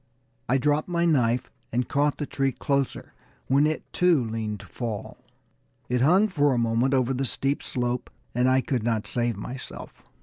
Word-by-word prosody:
I 130 - +4
dropped 145 +3 +1
my 170 -1 +1
knife 125 -6 +2 0.2
and 125 +2 0
caught 145 0 +1
the 145 - -2
tree 135 -1 0
closer, 140 -1 -2 0.3
when 140 +3 +4
it, 155 - -2
too, 175 -7 +4
leaned 110 -2 -3
to - - -12
fall. 115 -5 -5 0.7
It 125 0 +1
hung 185 +10 +5
for 145 -8 +2
a - - 0
moment 120 +3 +2
over 130 0 +2
the 130 +1 -1
steep 135 +2 -1
slope, 125 -1 -2 0.2
and 125 +2 +3
I 130 0 +4
could 130 -2 -1
not 110 -1 0
save 120 -3 -1
myself. 125 +5 -8
130 Hz, 175 wpm, -26 LUFS, 120-145 Hz, 0.7 s, hung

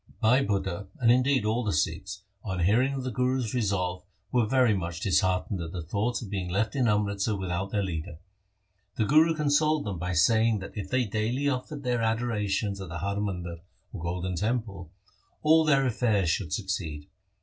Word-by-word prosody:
Bhai 125 +4 +4
Budha, 100 -3 -2
and 120 -2 +5
indeed 130 -1 +3
all 115 +3 +1
the 105 - 0
Sikhs, 95 +5 -2 0.2
on 95 -4 -3
hearing 120 +10 +3
of 135 - -4
the 130 - -3
Guru's 125 -1 0
resolve, 95 -6 -1 0.3
were 120 -3 +2
very 125 -2 +4
much 85 -3 -3
disheartened 95 -1 +1
at 80 -1 -6
the 90 -3 -4
thought 105 +9 -1
of 105 - -8
being 95 -3 -3
left 105 +7 0
in 130 -3 +2
Amritsar 105 0 +1
without 95 +1 -3
their 100 0 0
leader. 85 -3 -4 0.8
The 110 - +1
Guru 160 +6 +5
consoled 150 0 +2
them 100 -5 -4
by 90 +1 -2
saying 110 +7 +4
that 100 +2 -8
if 100 -3 -5
they 130 +1 +1
daily 115 +7 -1
offered 140 +2 -3
their 125 -2 0
adorations 105 -3 -1
at 95 - -7
the 85 - -5
Har 100 +3 -2
Mandar 90 -4 -4 0.4
or - - -6
Golden 90 +2 -3
Temple, 105 -3 -2 0.5
all 160 +1 +6
their 140 -3 +4
affairs 110 -8 +1
should 80 -2 -2
succeed. 90 -8 -3
105 Hz, 185 wpm, -28 LUFS, 95-125 Hz, 0.8 s, all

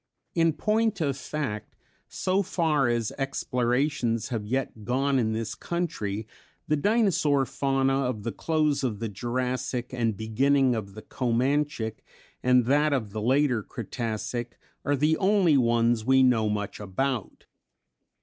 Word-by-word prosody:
In 165 -1 +3
point 215 +4 +1
of 140 -4 0
fact 130 -6 -5 0.3
so 190 +2 0
far 160 -8 +1
as 120 -2 0
explorations 125 -2 0
have 110 -4 -3
yet 125 -3 -2
gone 135 +4 +1
in 110 -2 0
this 110 -1 -3
country, 110 - -3 0.4
the 155 - +2
Dinosaur 155 - +2
fauna 135 0 +1
of 115 -5 -3
the 115 - -2
close 155 +4 0
of 115 -5 -1
the 115 - -3
Jurassic 125 +3 -3
and 115 -4 0
beginning 130 +5 +2
of 100 -4 -5
the 110 - -9
Comanchic 125 -2 -1 0.4
and 125 -1 +4
that 145 +3 +3
of 110 -7 -1
the 110 +1 -4
later 130 0 +2
Cretacic 120 +2 -4 0.3
are 145 +1 +1
the 150 +3 +2
only 190 -5 +3
ones 115 -2 +2
we 130 +2 +4
know 115 -4 +3
much 105 -1 -3
about. 110 +4 -3
130 Hz, 140 wpm, -27 LUFS, 115-145 Hz, 0.4 s, and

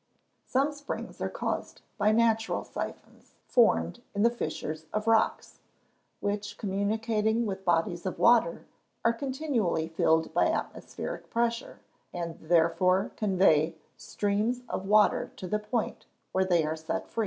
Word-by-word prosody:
_ - - -33
Some 275 +3 +2
springs 290 0 -6
are - - -1
caused - - -4 0.2
by 210 +1 +4
natural 225 0 +2
syphons - - -8
formed 240 0 +3
in 205 - +2
the 235 - +5
fissures 160 -9 -4
of 215 0 -2
rocks, 225 -1 +1 0.6
which, 205 0 -3
communicating 220 +3 0
with 190 -2 -4
bodies 175 +1 +1
of 185 - -3
water, 235 -8 +4 0.4
are 230 - +5
continually 255 - -1
filled 160 0 +1
by - - +3
atmospheric - - -4
pressure, 235 0 -1 0.3
and 170 -2 -5
therefore 185 +3 +2
convey 180 -6 +3 0.2
streams 210 +5 -1
of 195 - -4
water 210 +1 +4
to 185 - -7
the 210 +4 0
point 210 +2 -3 0.2
where 190 0 +2
they 175 -4 +3
are 155 +1 -1
set 160 +1 -4
free. - - -6
205 Hz, 140 wpm, -29 LUFS, 175-230 Hz, 0.6 s, the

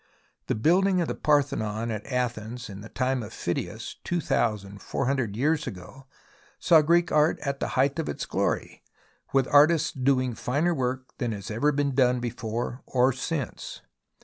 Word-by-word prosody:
The - - 0
building 180 - +3
of 170 - 0
the - - -2
Parthenon 120 -7 0
at 105 -1 -5
Athens 120 -3 -3
in 100 +1 -9
the 110 - -10
time 130 0 -1
of 110 -1 -7
Phidias, 85 -5 -4
two 175 - -1
thousand 105 - -1
four 135 - -2
hundred 125 -6 0
years 150 +6 +1
ago, 95 +9 -9 0.5
saw 160 -2 +5
Greek 170 +2 +3
art 150 +1 +3
at 140 -1 -3
the - - -1
height 135 +4 +2
of 160 - -2
its - - -4
glory, - - -2 0.5
with 135 -2 +2
artists 150 +2 +5
doing 130 -1 +1
finer 145 +10 0
work 130 -2 -3
than 120 -3 -1
has 100 +2 -6
ever 140 +8 +2
been 140 -1 0
done 125 -1 +3
before 120 +1 -4
or 130 +1 +3
since. 140 0 -4
130 Hz, 170 wpm, -26 LUFS, 115-145 Hz, 0.5 s, saw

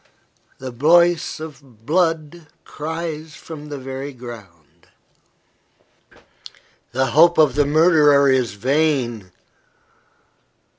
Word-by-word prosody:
The 130 -1 -7
voice 170 +7 +2
of 140 -8 -12
blood 165 -1 -1 0.2
cries 160 0 -6
from 150 -1 -10
the 145 - -6
very 135 +1 -7
ground. 110 - -13 2.0
The 130 0 -1
hope 170 +6 +5
of 150 -5 +4
the 145 +1 +1
murderer 150 -2 +4
is 125 -6 +1
vain. 125 -4 -1
145 Hz, 90 wpm, -20 LUFS, 130-160 Hz, 2.0 s, hope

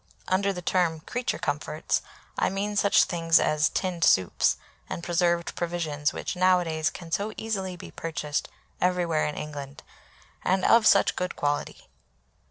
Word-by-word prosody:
Under 195 +2 +2
the 180 -2 -6
term 165 -4 +1
"creature 245 +9 -3
comforts" 150 +2 -2 0.3
I - - +1
mean 200 +2 -2
such 200 0 +5
things 165 -1 +3
as 155 0 +2
tinned 180 -3 -2
soups 95 - +3 0.3
and 170 - -5
preserved 175 0 +1
provisions 160 -4 -1
which - - -4
nowadays 180 -3 +2
can 170 -3 -10
so 205 +5 -1
easily 195 -4 -3
be 175 - -10
purchased 150 -3 -3 0.3
everywhere 175 -3 +1
in 150 - -4
England, 145 -2 -7 0.6
and 185 +1 +1
of 230 -1 +6
such 200 - +5
good 180 0 -3
quality. 145 0 -2
175 Hz, 145 wpm, -26 LUFS, 155-185 Hz, 0.6 s, of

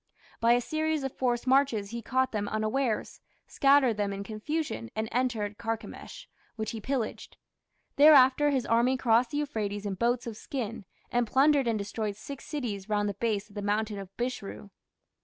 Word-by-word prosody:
By 230 +1 +5
a 245 - +3
series 310 +2 -1
of 270 - -2
forced 245 -2 0
marches 255 -6 +2
he 235 0 -4
caught 260 +3 0
them 205 -2 -2
unawares, 215 +3 -1 0.2
scattered 275 -5 +3
them 205 -1 0
in 200 0 -4
confusion, 215 - -4
and 220 0 -1
entered 225 -4 -1
Carchemish, 225 - -6 0.3
which 220 -1 -3
he 225 - -6
pillaged. 250 -2 -3 0.6
Thereafter 285 -1 +7
his 265 -4 0
army 240 +3 +3
crossed 235 0 +3
the 290 - -3
Euphrates 210 -8 -3
in 200 - -2
boats 235 +5 0
of 225 -3 -6
skin, 230 -5 -5 0.3
and 240 -1 +1
plundered 275 +2 +4
and 225 -2 +1
destroyed 205 +1 -3
six 275 +6 -9
cities 225 -9 -4
round 205 -1 +1
the - - -3
base 210 0 -1
of 205 - -19
the 205 - -5
mountain 210 0 -1
of 195 -2 -8
Bishru. 240 -4 -5
230 Hz, 175 wpm, -29 LUFS, 210-265 Hz, 0.6 s, Thereafter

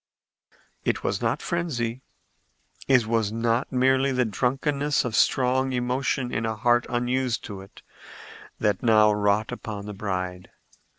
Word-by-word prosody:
It - - -1
was - - -1
not - - -1
frenzy, 130 -9 -2 0.9
it 125 -4 +4
was 110 -2 0
not 115 +2 0
merely 130 +1 +3
the 125 -1 +1
drunkenness 135 +6 0
of 115 -3 -2
strong 130 +1 +2
emotion 125 0 -1
in 115 - -1
a 110 -1 -1
heart 120 +2 +2
unused 125 0 -1
to 100 -3 -7
it, 95 - -15 0.8
that 105 -3 +1
now 110 -2 +5
wrought 105 +1 +1
upon 105 -2 -6
the 105 - -6
bride. 95 -2 -4
120 Hz, 135 wpm, -25 LUFS, 105-130 Hz, 0.9 s, now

